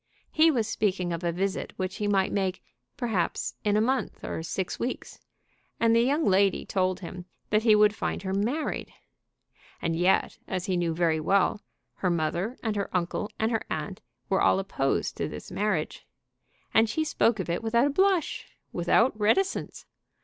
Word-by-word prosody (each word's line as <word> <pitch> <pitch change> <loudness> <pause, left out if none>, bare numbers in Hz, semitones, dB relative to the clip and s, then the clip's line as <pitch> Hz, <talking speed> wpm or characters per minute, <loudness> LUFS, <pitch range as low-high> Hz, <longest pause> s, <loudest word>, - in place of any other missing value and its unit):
He 320 +1 +5
was 235 -8 +1
speaking 185 -4 0
of 170 +1 -4
a 170 - +1
visit 190 +3 -2
which 185 0 -3
he 210 -2 -1
might 195 -2 +2
make, 190 -2 -1 0.3
perhaps, 220 -8 -1
in 210 0 +2
a - - +3
month 260 +3 -1
or - - -4
six 175 +3 -3
weeks, 245 - -4 0.6
and 230 0 +4
the 230 - +5
young 285 +6 +2
lady 195 0 +3
told 185 -1 0
him 180 0 -7 0.3
that 215 0 +4
he 220 -2 +5
would 210 0 +5
find - - -3
her 190 0 -2
married! 235 +11 -1 0.9
And 165 - -1
yet, 180 +3 +2
as 185 -1 -3
he 185 - 0
knew 170 -2 0
very 165 -2 +2
well, 200 +5 +2 0.4
her 185 - 0
mother 175 +8 -1
and 220 -2 -1
her 200 -1 -2
uncle 180 +4 -2
and 220 +1 0
her 225 - 0
aunt 155 +5 -4 0.3
were 190 - +1
all - - +4
opposed 185 -8 -1
to - - -1
this 75 - -8
marriage. 200 -7 -2 0.7
And 225 0 +4
she 315 - 0
spoke 230 -7 +1
of 190 - -3
it 170 0 -1
without 235 +3 +2
a - - +2
blush, 380 +1 +1 0.3
without 200 +8 +3
any 215 - -21
reticence! 370 - 0
200 Hz, 180 wpm, -27 LUFS, 180-225 Hz, 0.9 s, He